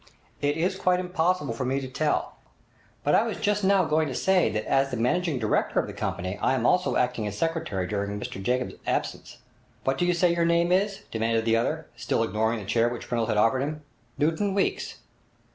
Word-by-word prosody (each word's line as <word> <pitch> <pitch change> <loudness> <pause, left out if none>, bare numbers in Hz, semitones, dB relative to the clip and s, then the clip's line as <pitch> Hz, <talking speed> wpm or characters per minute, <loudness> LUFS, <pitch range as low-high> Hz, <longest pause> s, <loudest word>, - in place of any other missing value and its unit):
'It 145 +1 +1
is 185 +3 0
quite 180 0 +2
impossible 180 -6 0
for 115 - -3
me 130 +2 0
to 135 - -5
tell. 150 +4 -1 0.7
But - - +2
I - - +6
was - - -2
just 210 -1 0
now 195 0 +4
going 155 0 +1
to 130 - -4
say 190 -1 +3
that 110 0 -3
as 135 0 +2
the 125 - -3
managing 160 +6 +1
director 110 -3 +1
of - - 0
the - - -8
company 95 +3 -3
I 135 - +2
am 120 -2 -1
also 180 +7 +2
acting 125 -4 0
as 105 0 -5
secretary 165 - -1
during 100 +1 -3
Mr 95 - -6
Jacobs' 125 +5 -1
absence.' - - -2 0.5
'What 135 0 0
do 175 - +2
you 180 - +2
say 175 0 +3
your 170 0 +1
name 170 +1 +2
is?' 200 +2 +1
demanded 115 0 0
the 115 0 +3
other, 155 +7 -1
still 115 0 0
ignoring 110 +1 0
the 105 - -7
chair 115 +4 +2
which 120 -1 -7
Pringle 115 -2 0
had 110 - 0
offered 115 +5 +3
him. 150 +3 -3 0.3
'Newton 165 +7 +1
Weeks.' 195 - -1
135 Hz, 210 wpm, -26 LUFS, 115-175 Hz, 0.7 s, I